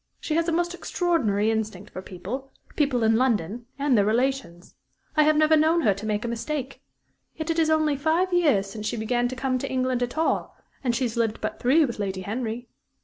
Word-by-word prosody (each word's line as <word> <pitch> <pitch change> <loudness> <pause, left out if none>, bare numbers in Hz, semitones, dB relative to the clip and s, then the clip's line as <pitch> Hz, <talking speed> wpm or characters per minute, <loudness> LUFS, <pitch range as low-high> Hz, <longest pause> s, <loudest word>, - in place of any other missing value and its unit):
She 310 - -3
has 330 +1 +1
a - - +1
most 345 +1 0
extraordinary 270 - 0
instinct 215 -3 -3
for 185 - -5
people 200 +9 -6 0.3
people 275 -6 +1
in 220 0 +4
London 230 -2 0
and 280 -2 +2
their 205 - +4
relations. 225 -5 -1 0.4
I 305 - +5
have 305 0 +4
never 310 +1 +5
known 320 +2 +3
her 210 -8 +3
make 215 0 -1
a - - -1
mistake. 265 +3 -4 0.5
Yet 315 +1 -2
it 330 - 0
is 320 -1 +3
only 310 -2 +2
five 325 +6 +1
years 295 - +3
since 210 +2 -6
she - - -2
began 240 +2 0
to 255 - -5
come 255 0 -1
to - - -4
England 255 -1 0
at 245 +4 -2
all; 320 - 0 0.3
and 240 -3 +1
she 260 - 0
has 235 -1 -2
lived 225 -1 0
but - - -4
three 295 +6 +4
with 235 -5 -5
Lady 190 -2 -2
Henry. 230 +4 -4
250 Hz, 210 wpm, -25 LUFS, 220-305 Hz, 0.5 s, I